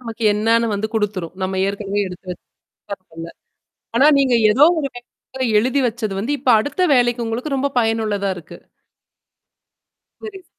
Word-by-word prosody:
நமக்கு 230 -2 -8
என்னன்னு 230 +2 +2
வந்து 215 +2 -2
குடுத்துரும். 195 -5 -2
நம்ம 190 0 -2
ஏற்கனவே 200 0 -3
எடுத்து 180 +1 -12
எடுத்து - - -15 0.5
வச்சிருந்த - - -3 0.3
டேப்ல - - -24 0.6
ஆனா, 270 +5 +5
நீங்க 260 -3 +2 0.2
ஏதோ 265 +7 +4 0.2
ஒரு 290 - -2
சமயத்துல 255 +2 -8
எழுதி 255 +5 0
வெச்சது 220 -3 -4
வந்து, 255 +8 -2
இப்ப 260 0 -1
அடுத்த 290 - -3
வேலைக்கு 240 -1 +1
உங்களுக்கு 250 +5 -3
ரொம்ப 280 +1 0
பயனுள்ளதா 220 -3 -1
இருக்கு. 160 - -12 1.6
புரியுது. 385 -4 -10
230 Hz, 145 wpm, -19 LUFS, 205-260 Hz, 1.6 s, ஆனா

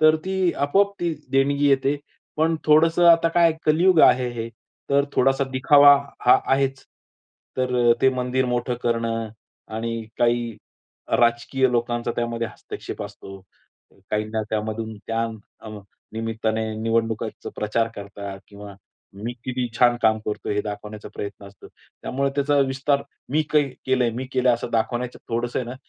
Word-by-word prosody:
तर 155 0 +6
ती 190 -2 0
आपोआप 195 +9 +2
ती 170 -2 0 0.2
देणगी 140 +1 +2
येते. 135 +1 +2 0.4
पण 160 +1 +2
थोडंसं 165 +3 +4
आता 165 0 +5
काय 165 0 +4
कलियुग 165 +3 +4
आहे 125 0 +5
हे. 115 - -4 0.4
तर 140 0 +4
थोडासा 135 +1 +2
दिखावा 145 +2 +7 0.3
हा 125 - +6
आहेच. 135 0 0 0.7
तर 125 -2 +3
ते 135 - +6
मंदिर 125 +1 0
मोठं 125 0 -1
करणं 115 -1 -1 0.5
आणि 115 0 -3 0.2
काही 120 -2 +1 0.6
राजकीय 120 +2 +2
लोकांचा 120 0 -1
त्यामध्ये 115 -1 -2
हस्तक्षेप - - -8
असतो. 100 -1 -10 0.7
काहींना 110 +1 -1
त्यामधून 110 +1 -3
त्या 115 0 -1 0.4
अ, 110 - -9 0.4
निमित्ताने 110 0 -2
निवडणुकीचा 115 0 -2
प्रचार 115 +2 0
करतात 100 -1 -8
किंवा 100 -1 -11 0.5
मी 120 - -2
किती 125 -1 -2
छान 120 -1 +5
काम 110 -1 +4
करतो 105 - -3
हे 105 0 +1
दाखवण्याचा 105 0 -7
प्रयत्न 100 0 -7
असतो. 100 0 -15 0.3
त्यामुळे 140 +1 -1
त्याचा 145 0 +2
विस्तार 140 +1 0 0.3
मी 155 +3 +2
कै 150 -1 +4 0.2
केलंय 125 -3 +2
मी 130 - -5
केलं 130 -1 +3
असं 120 - -6
दाखवण्याच्या 120 +2 -2
थोडंसं 120 +1 -1
आहे 125 - -3
ना, 125 - -6
120 Hz, 140 wpm, -23 LUFS, 115-140 Hz, 0.7 s, दिखावा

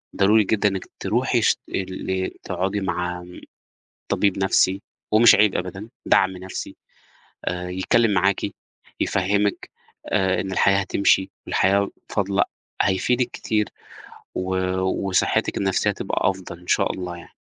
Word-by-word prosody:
ضروري 105 +3 +4
جدًا 105 +1 +2
إنِّك 95 -2 -4
تروحي - - +1
شت - - +3
ال 95 0 -3
تقعدي 95 +2 -2
مع 90 -1 -2
امم، 90 0 -12 0.7
طبيب 100 -2 +1
نفْسي، 95 +1 +2 0.3
ومش 115 +2 +8
عيب 105 -2 +4
أبدًا، 95 +4 -5 0.2
دعم 95 -1 +3
نفْسي، 95 +1 -7 0.7
آآ 90 0 -3
يتكلّم 105 +5 +2
معاكِ، 95 +1 +2 0.5
يفهّمِك، 100 +2 0 0.4
آآ 95 0 +2
إن 95 - -5
الحياة 100 +1 +3
هتمشي 95 0 +2 0.2
والحياة 100 +1 +2 0.2
فاضلة، 100 -1 +1 0.4
هيفيدِك 120 +6 +1
كتير، 105 -1 -1 0.7
و 95 0 -2 0.5
وصحتِك 90 - +1
النفسية 95 -1 +1
هتبقى - - 0
أفضل 95 -2 -8
إن 90 - -18
شاء - - +2
الله 90 -1 -5
يعني. 85 - -14
95 Hz, 125 wpm, -23 LUFS, 95-100 Hz, 0.7 s, ومش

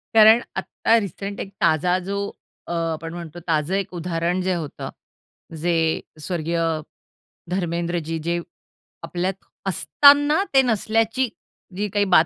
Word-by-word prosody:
कारण 220 +2 +8 0.2
आत्ता 225 - +1
रिसेंट 200 -1 -4
एक 195 - -5
ताजा 175 +3 +3
जो 200 +1 -2 0.5
अ, - - -5
आपण 165 -1 -2
म्हणतो 170 -1 -7
ताजं 160 +2 +1
एक 195 -2 -2
उदाहरण 175 +1 -1
जे 185 0 0
होतं 160 -5 -5 0.7
जे 175 0 +1 0.5
स्वर्गीय 165 +1 -2 0.9
धर्मेंद्रजी 170 -2 -1
जे 170 0 +1 0.6
आपल्यात 175 +3 -1 0.3
असताना 290 - +5
ते 270 - +7
नसल्याची 225 +1 +1 0.5
जी 210 +1 0
काही 205 +1 +1
बात 160 - +7
180 Hz, 120 wpm, -23 LUFS, 170-210 Hz, 0.9 s, कारण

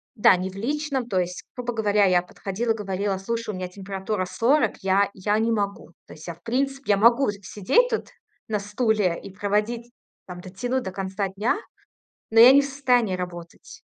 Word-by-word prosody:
да, 200 -4 +5
ни 185 +1 -3
в 190 - -12
личном, 270 +3 -2
то 190 - +1
есть, 180 0 -3
грубо 245 -1 -3
говоря, 210 -2 +2
я 180 -2 +4
подходила, 200 +5 -3
говорила: 200 -2 -2
"Слушай, 230 +3 -4
у 195 - -6
меня 185 0 -4
температура 195 +1 -4
40, 235 +5 +1
я 195 +1 +2
я 205 +2 0
не 225 +1 +1
могу". 200 -5 -2 0.2
То - - -11
есть 155 - -12
я, 170 - -5
в - - -29
принципе, 270 +1 -1
я - - +2
могу 235 +5 +4
сидеть 210 - +2
тут 450 - -2 0.4
на 215 -2 -1
стуле 205 -3 0
и - - -9
проводить, 210 +4 -2 0.3
там, 180 -1 -9
дотянуть 245 +8 -3
до 190 - -5
конца 195 +1 -3
дня, 205 - 0 0.7
но 225 - +2
я 245 +3 +10
не 280 +1 +6
в - - -3
состоянии 250 -7 +1
работать. 175 -2 -9
205 Hz, 190 wpm, -24 LUFS, 190-240 Hz, 0.7 s, я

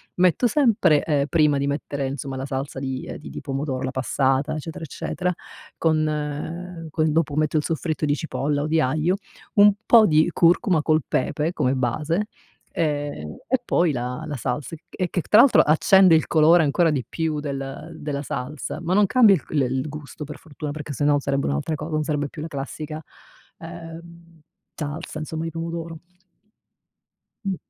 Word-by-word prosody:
metto 185 +7 +3
sempre 225 - +3
ehm 145 -3 +1
prima 150 -3 +3
di 140 0 -1
mettere 140 -1 -3
insomma 135 0 -5
la 135 - -4
salsa 135 0 -4
di 130 -1 -4
uhm, - - -6
di 150 - -10
di - - -7
pomodoro, 135 -1 -3
la 130 - -2
passata, 135 +2 0
eccetera 160 +1 -6
eccetera, 180 +5 -3 0.4
con 155 +2 -2
con 155 -1 +1
dopo 150 -2 0
metto 155 0 +1
il 150 - +1
soffritto 160 -1 -2
di 145 - +1
cipolla 145 -2 -2
o 150 - -2
di 160 +1 +2
aglio, 155 +7 +1 0.4
un 205 0 +7
po' 225 -2 +7
di 155 +2 +4
curcuma 175 0 +3
col 155 0 +2
pepe 150 +5 -1
come 130 -7 0
base. 150 - -1 0.5
Ehm, 145 - -2
e 260 - +3
poi 170 -9 +2
la 125 +4 -4
la 150 - -4
salsa 145 +6 -3
e 155 - -18
e 180 -2 -3
che 180 - -1
tra 210 - +4
l'altro 260 +1 +7
accende 185 +4 +5
il 160 - +3
colore 160 +2 +5
ancora 165 +3 +2
di 135 -4 -2
più 160 -2 -2
del 140 +2 -6
della 145 -2 -4
salsa, 150 +4 -5
ma 175 +2 -1
non 205 +1 +5
cambia 225 -2 +6
il 155 - -5
c - - -17
il 130 -1 0
gusto 150 0 -8
per 150 +1 -8
fortuna, 150 -1 -7
perché 150 0 -6
sennò 145 +1 +2
sarebbe 140 0 -1
un'altra 70 - -1
cosa, 155 +2 -6
non 155 0 0
sarebbe 145 -2 -1
più 155 - -9
la 160 - -5
classica, 155 +2 -6 0.6
uhm, 170 0 -11 0.3
salsa 155 +1 -5
insomma, 160 +1 -4
di 165 - -4
pomodoro. 165 0 -5 1.5
Mh. 195 -2 -1
155 Hz, 180 wpm, -23 LUFS, 145-165 Hz, 1.5 s, un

